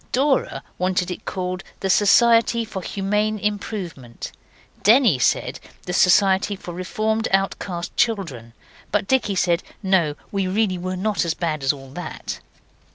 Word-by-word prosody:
Dora 270 +2 +1 0.2
wanted 185 0 0
it 180 - -7
called 185 0 -3 0.2
the 195 - -1
Society 230 +3 +4
for 200 -3 -6
Humane 210 +3 -1
Improvement; 190 - -4 0.5
Denny 220 - +5
said - - +1 0.3
the 180 - -4
Society 195 +2 +4
for 180 -2 -8
Reformed 215 +5 -1
Outcast 195 -2 -1
Children; 165 - -1 0.4
but 210 -1 0
Dicky 255 -7 +1
said, 175 -1 +2 0.2
No, 180 -6 +2 0.2
we 195 -2 0
really 190 -1 0
were 185 +1 -3
not 210 +2 -1
so 170 - +1
bad 155 -4 -1
as 135 - +3
all 135 -2 -10
that. 175 +6 -6
190 Hz, 140 wpm, -22 LUFS, 175-215 Hz, 0.5 s, Denny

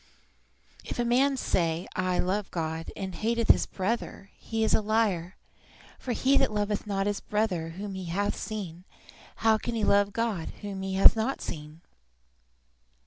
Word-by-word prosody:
"If - - -6
a 240 - +1
man 265 +3 +3
say, 170 -7 0
I 185 -1 0
love 195 +2 0
God, 160 -1 -3
and 190 -2 -5
hateth 230 +3 -1
his - - +6
brother, 200 0 -3
he 225 -1 -2
is 220 - +2
a - - +4
liar; 205 -5 0 0.6
for 255 - -4
he 270 +3 +3
that 270 - +2
loveth 210 0 -1
not 195 -1 0
his 205 -1 0
brother 190 -6 -1
whom 200 0 -5
he 190 -1 -5
hath 195 +5 -1
seen, 185 -6 -6 0.6
how 220 -1 +5
can 240 +1 -3
he 220 - -1
love 200 0 +4
God 220 -7 -1
whom 200 -2 -5
he 190 0 -3
hath 195 - +8
not 225 +5 -1
seen?" 155 0 -7
205 Hz, 165 wpm, -28 LUFS, 185-225 Hz, 0.6 s, hath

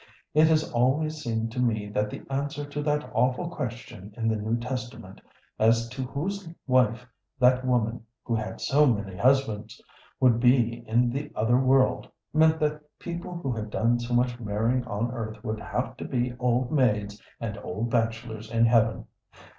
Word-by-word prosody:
It 155 +1 +6
has 155 -1 +3
always 145 +6 +1
seemed 115 -3 -2
to 125 - -5
me 110 -4 0
that 105 0 -1
the - - -8
answer 145 +2 -3
to 145 +1 -5
that 150 0 0
awful 130 +7 +1
question 115 - -6
in 115 -1 0
the 110 - +1
New 110 +2 -1
Testament, 120 -4 -6 0.4
as 115 +1 +3
to 125 +2 -6
whose 165 +8 -4 0.2
wife 125 -2 +2 0.3
that 125 0 +4
woman 120 -2 0 0.2
who 120 - -2
had 110 -1 -3
so 150 +2 +3
many 100 -6 -1
husbands 125 -1 +1 0.4
would 125 -3 +4
be 120 -1 +3
in 120 +2 +2
the 145 +3 -4
other 120 +3 +3
world, 130 -1 +3 0.2
meant 160 +1 +4
that 150 0 0 0.2
people 175 +1 -6
who 140 -6 -3
had 110 -2 -4
done 115 +3 +1
so 120 0 -2
much 120 0 +1
marrying 115 +3 0
on 115 +1 -2
earth 110 -3 -6
would 110 0 -3
have 125 +1 -3
to - - -6
be 125 -1 -1
old 125 0 +1
maids 105 -8 +1 0.2
and 105 -3 -4
old 110 +4 -4
bachelors 115 -1 -2
in 115 0 +3
heaven. 115 -1 +3
120 Hz, 170 wpm, -27 LUFS, 110-135 Hz, 0.4 s, It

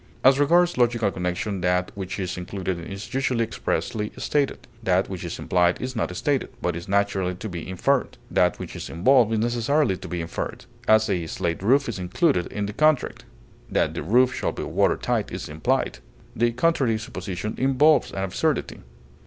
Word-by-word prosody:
As 135 +1 +6
regards 170 +1 +3
logical 115 -4 +2
connection 90 +2 -2
that 90 0 +1
which 95 -2 -5
is 90 -2 -2
included 90 0 -4
is 105 +5 -7
usually 130 -3 +1
expressly 105 -1 -2
stated; 145 -2 -1
that 95 -3 +1
which 95 -2 -5
is 85 0 -5
implied 90 -1 +2
is 130 0 -4
not 90 -5 -2
stated, 140 -3 0
but 90 - -1
is 85 +1 -7
naturally 100 -2 +1
to 110 - -6
be 90 -3 -6
inferred; 130 +9 0
that - - +3
which - - -7
is - - -6
involved 115 +6 +4
is 110 - +1
necessarily 120 +2 +1
to - - -9
be 90 - -3
inferred; 85 0 -5 0.2
as, 110 0 +5
a 90 -5 -1
slate 85 +1 -2
roof 135 +8 +3
is 115 -5 -4
included 90 - +1
in 105 -1 -3
the 105 - -5
contract; 155 +1 +1 0.4
that - - +1
the - - -4
roof 125 +4 +3
shall - - -1
be - - -5
water - - +1
tight - - -1
is - - -5
implied; 75 -4 -1 0.4
the 120 +1 +2
contrary 125 -3 +2
supposition 105 -3 -5
involves 135 +2 +4
an 95 - -3
absurdity. 95 -2 -1
105 Hz, 180 wpm, -24 LUFS, 90-130 Hz, 0.4 s, As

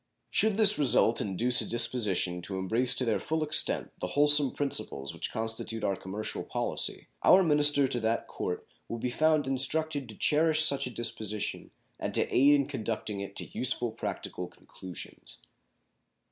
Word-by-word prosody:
Should 215 -2 +1
this 210 -2 +5
result 125 -4 +3
induce 120 +5 +2
a - - -4
disposition 105 -7 +1
to 95 +2 -3
embrace 115 +7 0
to 130 - +1
their 115 - 0
full 160 0 -2
extent 155 0 0
the - - -3
wholesome 145 -1 +4
principles 70 - -4
which - - -4
constitute 115 0 -5
our 100 - 0
commercial 100 +4 -6
policy, - - 0
our 190 +1 +6
minister 145 -3 +3
to 125 -2 -1
that 115 0 -1
Court 90 - -5 0.2
will 115 - -5
be 125 +2 -3
found 155 +1 +1
instructed 140 +1 0
to 110 - -10
cherish 155 +1 +3
such 140 -2 +3
a - - -4
disposition 110 -3 -3 0.3
and - - -4
to - - +2
aid 140 +3 +5
in 140 -1 +1
conducting 110 -6 -4
it 100 0 -7
to - - -7
useful 125 -2 0
practical 110 - -5
conclusions. 90 -3 -10
125 Hz, 160 wpm, -28 LUFS, 110-145 Hz, 0.3 s, our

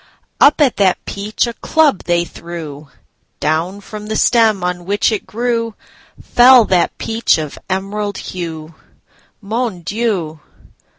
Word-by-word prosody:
Up 295 - +5
at 275 -5 +3
that 190 -3 +3
peach 205 +4 -2
a 235 - -4
club 300 - +1
they 175 0 +1
threw—Down 160 +2 -6
from 210 +1 -9
the 220 - -3
stem 220 -5 +3
on 180 -1 -3
which 205 +4 +1
it 215 - -3
grewFell 235 +1 +2
that 180 -2 +1
peach 225 0 +1
of 155 -2 -5
emerald 200 +2 -3
hue. 165 -3 -6 0.7
Mon 220 -2 -3
Dieu! 185 -5 -2
200 Hz, 120 wpm, -17 LUFS, 175-230 Hz, 0.7 s, Up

